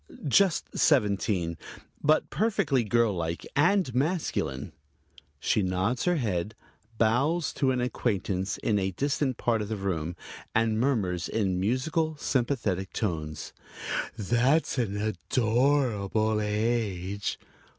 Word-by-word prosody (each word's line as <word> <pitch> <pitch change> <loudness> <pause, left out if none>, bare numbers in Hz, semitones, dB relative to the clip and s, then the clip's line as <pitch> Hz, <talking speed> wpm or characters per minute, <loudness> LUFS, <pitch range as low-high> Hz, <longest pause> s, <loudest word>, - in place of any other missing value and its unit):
"Just 185 +5 +2
seventeen, 100 - +2 0.4
but 155 +1 +3
perfectly 150 - +1
girl 115 0 +2
like 85 -1 -3
and 170 -1 +3
masculine." 135 - -1 0.7
She 105 - +1
nods 95 +6 0
her 180 - +3
head, 105 - -2 0.4
bows 135 +10 +2
to 135 - +1
an 130 -1 +1
acquaintance 100 -5 -1
in 105 -2 +1
a 95 0 0
distant 135 - -1
part 115 -2 +1
of 105 - -4
the 110 - -2
room, 85 -4 -2 0.4
and 110 -1 +2
murmurs 95 - 0
in 95 -5 0
musical, 150 - 0
sympathetic 120 -9 -1
tones: 80 -7 -3 0.6
"That's 125 - +2
an 105 -4 -1
adorable 110 -2 +1
age." 105 -3 -1
110 Hz, 110 wpm, -28 LUFS, 95-135 Hz, 0.7 s, but